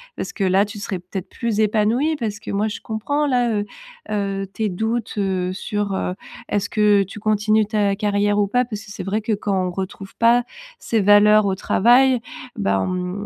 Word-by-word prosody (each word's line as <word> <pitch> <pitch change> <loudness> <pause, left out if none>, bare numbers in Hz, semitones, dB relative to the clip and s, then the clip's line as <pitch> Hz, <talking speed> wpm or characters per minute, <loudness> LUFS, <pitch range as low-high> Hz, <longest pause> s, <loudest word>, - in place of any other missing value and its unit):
Parce - - -5
que 200 - -2
là 190 +2 +3
tu 205 0 -9
serais 195 -2 -4
peut-être 180 +1 -7
plus 230 -3 -2
épanouie. 220 +8 +2
Parce 210 -5 -4
que - - -7
moi 205 +2 0
je 210 - -5
comprends 265 +7 -1
là, 245 -3 +1
heu 205 0 -1 0.5
heu, 195 -1 -2
tes 220 -1 -1
doutes 220 +5 -2
heu 185 -2 -1
sur, 205 +1 -3
heu, 180 - -2 0.4
est-ce 205 0 -1
que 210 -2 +3
tu 195 +3 -10
continues 215 0 +2
ta 205 -2 +1
carrière 205 0 +1
ou 205 - +2
pas? 245 +4 +1
Parce 215 -3 -6
que 200 - -12
c'est - - -6
vrai 210 +3 -1
que 220 - -3
quand 195 -3 -1
on - - -3
retrouve 195 +1 -6
pas 235 +1 +4 0.4
ses 225 -2 0
valeurs 205 +1 +6
au 190 - 0
travail, 250 +6 +4 0.4
bah, 100 0 +1
on 180 - -3
205 Hz, 200 wpm, -21 LUFS, 195-220 Hz, 0.5 s, valeurs